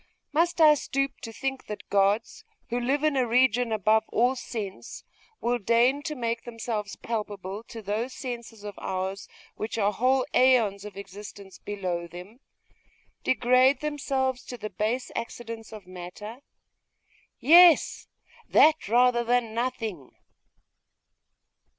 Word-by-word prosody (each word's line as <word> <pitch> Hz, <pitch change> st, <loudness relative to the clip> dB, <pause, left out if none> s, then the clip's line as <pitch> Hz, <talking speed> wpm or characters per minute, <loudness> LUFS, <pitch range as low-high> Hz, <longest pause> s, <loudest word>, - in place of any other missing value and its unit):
Must 340 Hz, +3 st, +1 dB
I 310 Hz, -2 st, +8 dB
stoop 275 Hz, -1 st, -2 dB
to 225 Hz, -, -7 dB
think 270 Hz, +3 st, -4 dB
that 210 Hz, -, -7 dB
gods, 200 Hz, -, +1 dB, 0.3 s
who 240 Hz, +1 st, -1 dB
live 270 Hz, +4 st, 0 dB
in 305 Hz, -2 st, +2 dB
a 255 Hz, -2 st, +2 dB
region 245 Hz, 0 st, +3 dB
above 220 Hz, +1 st, +3 dB
all 245 Hz, +3 st, +2 dB
sense, 215 Hz, -6 st, -7 dB, 0.4 s
will 240 Hz, +1 st, 0 dB
deign 240 Hz, +6 st, +3 dB
to 305 Hz, 0 st, -4 dB
make 230 Hz, -2 st, -2 dB
themselves 225 Hz, -3 st, -4 dB
palpable 205 Hz, -3 st, -5 dB
to 225 Hz, -1 st, -9 dB
those 215 Hz, +6 st, -2 dB
senses 235 Hz, -4 st, -7 dB
of 205 Hz, -1 st, -6 dB
ours 190 Hz, +1 st, -4 dB, 0.3 s
which 220 Hz, +2 st, -4 dB
are 205 Hz, -1 st, +1 dB
whole 255 Hz, +3 st, +2 dB
aeons 230 Hz, -6 st, +3 dB
of 205 Hz, -2 st, -9 dB
existence 200 Hz, 0 st, -10 dB
below 180 Hz, -4 st, -4 dB
them? 180 Hz, +8 st, -11 dB, 0.8 s
Degrade 255 Hz, +2 st, +3 dB
themselves 270 Hz, -4 st, -1 dB
to 245 Hz, -, -7 dB
the 215 Hz, -2 st, -6 dB
base 220 Hz, +7 st, -2 dB
accidents 230 Hz, -1 st, -6 dB
of 215 Hz, -2 st, -10 dB
matter? 185 Hz, +5 st, -9 dB, 1.0 s
Yes! 345 Hz, +1 st, +6 dB, 0.4 s
That, 315 Hz, 0 st, +5 dB
rather 240 Hz, +2 st, +4 dB
than 240 Hz, -1 st, 0 dB
nothing!.... 225 Hz, -, -4 dB
230 Hz, 130 wpm, -27 LUFS, 205-255 Hz, 1.0 s, I